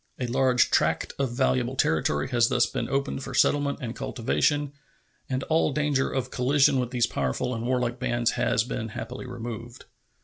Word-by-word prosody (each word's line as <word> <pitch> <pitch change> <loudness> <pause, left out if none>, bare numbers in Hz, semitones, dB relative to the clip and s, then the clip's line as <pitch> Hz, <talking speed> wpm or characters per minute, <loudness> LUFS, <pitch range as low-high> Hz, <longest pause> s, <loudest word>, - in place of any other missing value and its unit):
A 125 - -1
large 125 0 +2
tract - - +1
of 135 -3 0
valuable 130 0 0
territory 80 - +1
has 120 -3 +3
thus 125 -1 +3
been - - -4
opened 140 0 -1
for 135 - -6
settlement 145 +2 +2
and 120 0 -4
cultivation, 145 +4 0 0.6
and 130 0 -1
all 160 -1 +2
danger 145 -2 0
of 130 -1 -2
collision 135 +1 +3
with 125 -1 -1
these 120 -2 +2
powerful 70 - -2
and 115 -1 -4
warlike 125 -1 0
bands 120 -2 +1
has 115 - +1
been 115 -1 -4
happily 115 +4 -7
removed. 120 0 -7
125 Hz, 170 wpm, -26 LUFS, 120-135 Hz, 0.6 s, has